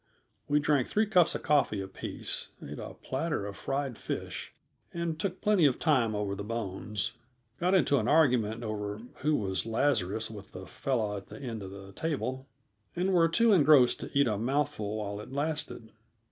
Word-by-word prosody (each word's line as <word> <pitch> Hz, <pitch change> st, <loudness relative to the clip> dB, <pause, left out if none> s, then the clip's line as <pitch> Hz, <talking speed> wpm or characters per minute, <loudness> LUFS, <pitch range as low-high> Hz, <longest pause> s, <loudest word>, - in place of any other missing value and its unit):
We 145 Hz, +1 st, +3 dB
drank 145 Hz, -3 st, +2 dB
three 215 Hz, +1 st, +2 dB
cups 180 Hz, -5 st, +4 dB
of -, -, -4 dB
coffee 130 Hz, -8 st, +2 dB
apiece, 95 Hz, 0 st, -5 dB
ate 75 Hz, +1 st, -8 dB
a -, -, -7 dB
platter 135 Hz, -5 st, -2 dB
of 100 Hz, -1 st, -6 dB
fried 135 Hz, +1 st, -3 dB
fish, -, -, -5 dB, 0.4 s
and 170 Hz, -2 st, -3 dB
took 185 Hz, +1 st, -3 dB
plenty 205 Hz, -7 st, +5 dB
of 130 Hz, -, 0 dB
time 125 Hz, -9 st, +2 dB
over 105 Hz, -1 st, -1 dB
the 100 Hz, +1 st, -5 dB
bones, 105 Hz, -2 st, -3 dB, 0.5 s
got 180 Hz, +2 st, +3 dB
into 140 Hz, -5 st, +4 dB
an 110 Hz, -, -1 dB
argument 120 Hz, -7 st, +3 dB
over 105 Hz, -2 st, -3 dB, 0.2 s
who 150 Hz, +2 st, +1 dB
was 95 Hz, -3 st, -1 dB
Lazarus 110 Hz, -3 st, +1 dB
with 105 Hz, -3 st, -10 dB
the 95 Hz, -, -8 dB
fellow 110 Hz, -2 st, -1 dB
at 100 Hz, -, -9 dB
the -, -, -10 dB
end 120 Hz, -5 st, -5 dB
of 95 Hz, -, -6 dB
the 95 Hz, 0 st, -10 dB
table, 135 Hz, -3 st, -3 dB, 0.5 s
and 185 Hz, +2 st, +1 dB
were 165 Hz, -2 st, +5 dB
too 225 Hz, +6 st, +4 dB
engrossed 145 Hz, -7 st, +6 dB
to -, -, -6 dB
eat 140 Hz, -, +6 dB
a 105 Hz, -3 st, 0 dB
mouthful 115 Hz, -4 st, -1 dB
while 105 Hz, -1 st, -4 dB
it 105 Hz, -, -11 dB
lasted. 145 Hz, -5 st, -3 dB
125 Hz, 180 wpm, -30 LUFS, 105-150 Hz, 0.5 s, engrossed